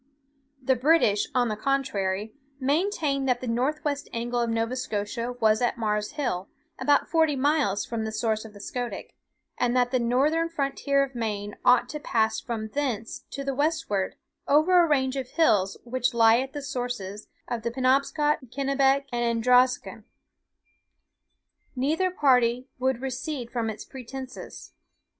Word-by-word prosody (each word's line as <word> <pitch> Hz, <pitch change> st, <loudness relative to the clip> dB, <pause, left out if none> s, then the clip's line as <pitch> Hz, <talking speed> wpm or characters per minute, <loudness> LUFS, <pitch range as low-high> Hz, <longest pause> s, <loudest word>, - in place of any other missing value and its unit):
"The 260 Hz, +1 st, +3 dB
British, 250 Hz, -6 st, +3 dB
on 245 Hz, -1 st, +3 dB
the 215 Hz, -, -2 dB
contrary, 215 Hz, -5 st, -1 dB, 0.3 s
maintained 285 Hz, -2 st, 0 dB
that 245 Hz, -1 st, +2 dB
the 255 Hz, -, -6 dB
north 255 Hz, +7 st, -1 dB
west 285 Hz, -1 st, -2 dB
angle 240 Hz, +1 st, -2 dB
of 235 Hz, -1 st, 0 dB
Nova 230 Hz, +2 st, -1 dB
Scotia 230 Hz, 0 st, -3 dB
was 220 Hz, -1 st, +3 dB
at 245 Hz, +1 st, +1 dB
Mars 210 Hz, -2 st, -1 dB
Hill, 195 Hz, -11 st, -2 dB, 0.3 s
about 290 Hz, -, +3 dB
forty 320 Hz, -3 st, +2 dB
miles 275 Hz, -7 st, +1 dB
from 230 Hz, -2 st, -3 dB
the 220 Hz, -, -3 dB
source 220 Hz, -1 st, -1 dB
of 220 Hz, -2 st, -11 dB
the -, -, -11 dB
Scoodic; 245 Hz, +4 st, -5 dB, 0.5 s
and 245 Hz, +1 st, +2 dB
that 245 Hz, -1 st, +2 dB
the 255 Hz, -, +2 dB
northern 285 Hz, +8 st, +2 dB
frontier 280 Hz, -2 st, 0 dB
of 275 Hz, -1 st, -5 dB
Maine 210 Hz, -3 st, -3 dB
ought 245 Hz, -1 st, +5 dB
to 300 Hz, -, -5 dB
pass 220 Hz, -6 st, +1 dB
from 220 Hz, -2 st, -4 dB
thence 240 Hz, -5 st, -3 dB
to 275 Hz, -, -5 dB
the 275 Hz, 0 st, -2 dB
westward 290 Hz, -, -1 dB, 0.3 s
over 325 Hz, +5 st, +5 dB
a -, -, +2 dB
range 265 Hz, -2 st, +2 dB
of 260 Hz, -2 st, -4 dB
hills 205 Hz, -, +2 dB
which 250 Hz, 0 st, -1 dB
lie 225 Hz, 0 st, +6 dB
at 265 Hz, +1 st, -4 dB
the 290 Hz, -1 st, -5 dB
sources 245 Hz, -7 st, -4 dB, 0.2 s
of 235 Hz, -2 st, -3 dB
the 235 Hz, -, -2 dB
Penobscot, 275 Hz, +4 st, +2 dB
Kennebec, 275 Hz, +1 st, +2 dB
and 240 Hz, 0 st, -1 dB
Androscoggin. 250 Hz, +2 st, +2 dB, 1.7 s
Neither 310 Hz, +9 st, +1 dB
party 250 Hz, -7 st, +3 dB
would 260 Hz, -1 st, 0 dB
recede 260 Hz, -1 st, -4 dB
from 235 Hz, -2 st, -1 dB
its 215 Hz, -, -7 dB
pretensions. 260 Hz, 0 st, -9 dB
250 Hz, 155 wpm, -26 LUFS, 230-275 Hz, 1.7 s, lie